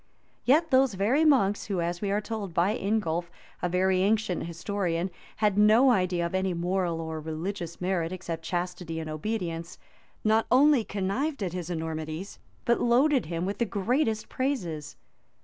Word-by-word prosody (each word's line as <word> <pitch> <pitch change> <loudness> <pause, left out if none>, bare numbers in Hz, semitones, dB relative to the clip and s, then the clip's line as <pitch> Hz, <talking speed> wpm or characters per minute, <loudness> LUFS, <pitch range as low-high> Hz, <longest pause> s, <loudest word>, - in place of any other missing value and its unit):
Yet 310 +6 +4
those 260 -4 +4
very 230 +11 +2
monks, 245 -10 +3
who, 195 -4 -2
as 175 +1 -2
we 205 - -1
are 205 +1 +1
told 205 -5 -5
by 190 +6 +2
Ingulf, 175 -5 -1 0.3
a 180 - 0
very 185 +1 +2
ancient 210 -2 +1
historian, 175 0 -2 0.2
had 210 -2 +2
no 220 +5 +6
idea 185 -5 +1
of 170 - -4
any 190 -1 0
moral 175 -1 -1
or 160 -1 -4
religious 170 +2 -5
merit, 180 -2 -1
except 170 -3 -5
chastity 175 -1 -3
and 160 -1 -5
obedience, 170 -1 -4 0.5
not 220 +1 +3
only 275 -1 +5
connived 210 +8 -2
at 180 -3 -3
his 180 -2 -4
enormities, 160 +2 -4 0.3
but 235 - +2
loaded 255 - +3
him 170 +1 -2
with 200 +1 -3
the 235 - +2
greatest 220 +2 0
praises. 175 - -3
190 Hz, 160 wpm, -28 LUFS, 170-220 Hz, 0.5 s, no